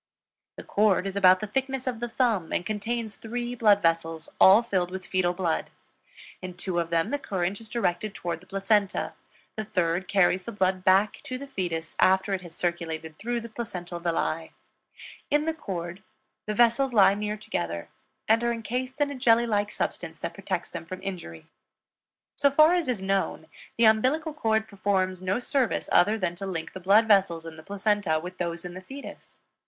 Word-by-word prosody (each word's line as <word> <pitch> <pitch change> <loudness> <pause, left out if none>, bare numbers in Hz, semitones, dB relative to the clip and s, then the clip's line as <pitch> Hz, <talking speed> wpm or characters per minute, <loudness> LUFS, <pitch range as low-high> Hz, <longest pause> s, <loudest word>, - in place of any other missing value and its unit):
The - - -9
cord 200 -2 +2
is 195 0 -4
about 185 -2 +6
the - - -1
thickness 265 +4 -2
of 250 -3 -2
the 240 0 -3
thumb 225 -9 0
and 175 - -1
contains 220 0 -3
three 240 +2 -4
blood 210 -4 +4
vessels, 165 -1 0
all 200 +5 +8
filled 185 -6 0
with 185 0 -6
fetal 185 -1 +1
blood; 175 -3 -1 0.7
in 185 -1 -7
two 180 -1 -2
of 170 -1 -2
them 165 -1 +1
the 285 - 0
current 190 -3 -2
is 220 - -10
directed 215 -2 -1
toward 170 -2 -3
the 185 - -20
placenta, 195 +1 0 0.4
the 215 - -3
third 180 -2 -1
carries 190 -1 +3
the 235 - -7
blood 185 -3 0
back 195 +3 +3
to 255 -3 -4
the 280 - -7
fetus 175 - -4
after 190 +1 +3
it 190 - -1
has 170 -2 -12
circulated 160 -2 -3
through 235 +1 -2
the 235 - -8
placental 180 -7 -6
villi. 165 -1 -2 0.8
In 295 +1 +2
the 320 - 0
cord 185 - -6 0.5
the 210 - -2
vessels 240 +3 +3
lie 200 -3 +6
near 210 +1 -3
together 85 - -4 0.4
and 225 +2 +4
are 235 - +2
encased 250 +4 -4
in 285 0 +2
a - - -5
jelly 235 -2 +4
like 205 -2 0
substance - - -4
that - - -5
protects - - -4
them - - -6
from 185 +2 -7
injury. 170 - -6 0.9
So 280 - +4
far 310 +4 +6
as 350 -4 +1
is 235 -7 -1
known; 195 -4 -1 0.3
the 230 - +5
umbilical 260 +9 +3
cord 220 -6 0
performs 190 -2 -1
no 185 +3 0
service 255 -1 0
other 205 +5 +4
than 185 -4 -2
to 195 - -5
link 165 -4 -4
the 190 - -7
blood 200 +5 +5
vessels 190 -6 +3
in 165 -1 -8
the 160 - -11
placenta 200 -3 0
with 180 +3 -9
those 170 -1 -3
in 175 - -6
the 185 - -8
fetus. 270 +8 -10
195 Hz, 190 wpm, -27 LUFS, 175-230 Hz, 0.9 s, all